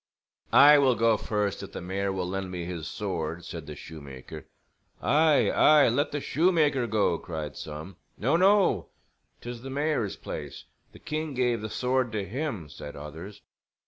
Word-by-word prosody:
"I 145 +1 +8
will 130 -3 +4
go 115 0 +3
first 105 -2 -2
if 100 0 -9
the - - -5
mayor 95 +2 -2
will 95 -2 -2
lend 95 0 -3
me 90 -2 -5
his 85 -3 -5
sword," 85 -4 -4
said 80 -4 -7
the 75 - -7
shoemaker. 70 -5 -10 0.5
"Aye, 150 +1 +3
aye, 150 -3 +6
let 140 +6 0
the 145 - -2
shoemaker 150 -5 +2
go," 100 -6 +1
cried 80 -5 -6
some. 75 +5 -8 0.2
"No, 135 +9 +1
no, 185 - +4 0.5
'tis 120 -1 -7
the 135 - -7
mayor's 140 -6 -1
place. - - -7 0.3
The - - -14
king 155 -2 -4
gave 125 -3 +1
the 110 - -4
sword 125 +1 0
to 105 -2 -2
him," 115 - -4
said 75 0 -9
others. 80 +8 -9
105 Hz, 165 wpm, -27 LUFS, 85-140 Hz, 0.5 s, I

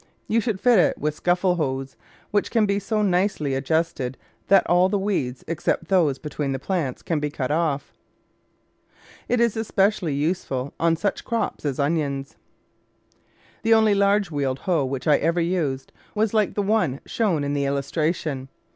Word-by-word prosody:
You 230 +1 +2
should 220 -4 -2
fit 245 -3 +5
it - - +3
with 150 +1 -1
scuffle 180 +3 +1
hoes, 135 -3 -2 0.4
which 205 - +1
can 225 -3 +3
be 200 0 +1
so 210 +1 -1
nicely 180 -7 +1
ad 135 +1 -4
justed 160 -6 0 0.3
that 195 -1 +5
all 180 +2 +4
the 205 - +1
weeds 180 -11 -2
except 165 0 -1
those 165 -8 +3
between 145 -2 -3
the - - -1
plants 140 -3 -3
can 165 -3 -1
be 150 0 -2
cut 140 -2 -3
off. 150 -3 -1 1.4
It 245 - +2
is 235 -2 +2
especially 200 -7 +1
useful 140 -4 -2
on 165 0 +3
such 200 +4 -2
crops 230 -8 -2
as 140 -3 -1
onions. 140 -2 -1 1.3
The 225 0 +4
only 220 -2 +4
large 200 -2 +2
wheeled 140 -3 -1
hoe 170 -7 +2
which 130 -1 -4
I 150 - +6
ever 165 +3 +1
used 165 -6 -1 0.2
was 215 0 +1
hke 215 -3 +1
the 205 - 0
one 195 -10 +1
shown 185 -10 0
in 140 0 -1
the 140 -1 0
illustration. 140 0 -1
165 Hz, 170 wpm, -24 LUFS, 140-200 Hz, 1.4 s, I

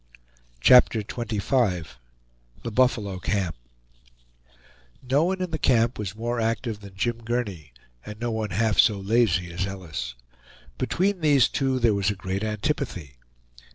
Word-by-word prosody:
CHAPTER 120 - +6
XXV 105 -4 -1 0.8
THE 115 - -4
BUFFALO 110 -6 +1
CAMP 95 -3 -1 1.5
No 140 +5 +3
one 185 +1 -1
in 180 - -4
the 160 - -2
camp 120 -2 +2
was 105 -1 -4
more 120 +1 -2
active 115 -1 -2
than 100 -2 -12
Jim 120 +3 -1
Gurney, 105 - -3 0.3
and 105 0 -9
no 120 0 -2
one 110 -1 -2
half 105 +1 0
so 105 -3 +5
lazy 95 -5 +1
as 95 +3 -2
Ellis. 80 -11 -6 0.6
Between 185 - 0
these 145 -4 +5
two 135 -2 0
there 115 -3 +3
was 100 0 +1
a 105 - -1
great 95 +1 -4
antipathy. 105 - -3
110 Hz, 140 wpm, -25 LUFS, 95-125 Hz, 1.5 s, CHAPTER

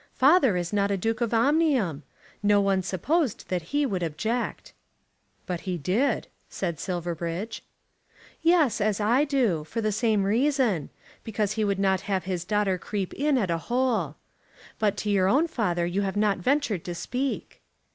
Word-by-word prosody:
Father 270 - +5
is 175 +2 -3
not 200 -1 +2
a 200 - 0
Duke 225 +4 -1
of 235 - 0
Omnium. 240 - +2 0.4
No 205 0 +4
one 195 -1 +2
supposed 245 - -1
that 180 -1 0
he 290 0 +1
would 195 -8 -2
object." 220 +9 -3 0.7
"But 180 -2 -3
he 180 - -1
did," 195 - 0 0.2
said 170 -5 -3
Silverbridge. 175 +2 -4 0.8
"Yes; 325 -9 +3
as 210 0 +1
I 240 +7 +3
do, 240 - +1
for 155 +9 -5
the 215 -1 0
same 215 -1 +1
reason; 230 - +1 0.3
because 210 -2 -1
he 215 0 -1
would 200 -2 +1
not 190 -1 +2
have 190 -3 0
his 180 -2 -3
daughter 195 -2 +1
creep 195 -1 -4
in 290 0 +1
at 195 -8 0
a 165 - 0
hole. 235 - +1 0.6
But 210 -2 +1
to 210 - -2
your 190 -2 +3
own 285 - +3
father 180 - 0
you 180 +3 -1
have 195 0 -2
not 205 -2 +2
ventured 245 - 0
to 175 - -4
speak." 255 +9 -4
205 Hz, 165 wpm, -26 LUFS, 185-245 Hz, 0.8 s, Father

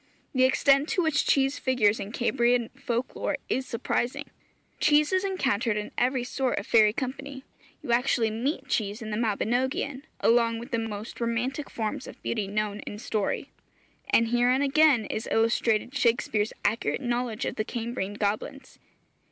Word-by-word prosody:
The 255 -1 +4
extent 275 +2 +3
to 360 - +1
which 315 -3 +1
cheese 270 0 +2
figures 225 -5 +2
in 200 - -5
Cambrian 240 -1 +1
folk 245 -1 -3
lore - - -1
is 260 0 -1
surprising; 240 +1 -2 0.5
cheese 300 +3 +4
is 375 0 +2
encountered 265 - 0
in 210 - -4
every 250 0 +1
sort 250 0 -1
of - - -3
fairy 215 -2 +5
company; 265 +3 -5 0.4
you - - -3
actually 235 -2 +2
meet 265 +5 -2
cheese 215 -3 -1
in 215 - -6
the - - -1
Mabinogion, 245 +5 -1 0.2
along 230 0 +3
with 240 +4 -9
the 230 - 0
most 220 +1 -6
romantic 245 +5 -2
forms 230 +5 -4
of - - -11
beauty 215 -4 -1
known 210 0 -2
in 205 - -5
story. 215 -2 -2 0.6
And 230 0 +3
herein 245 +3 +3
again 280 -4 +4
is 220 - -4
illustrated 225 +1 +1
Shakspeare's 230 -4 +1
accurate 220 +6 0
knowledge 240 -3 -2
of - - -2
the 215 - -1
Cambrian 230 -3 -4
goblins. 215 +6 -3
240 Hz, 160 wpm, -27 LUFS, 220-265 Hz, 0.6 s, fairy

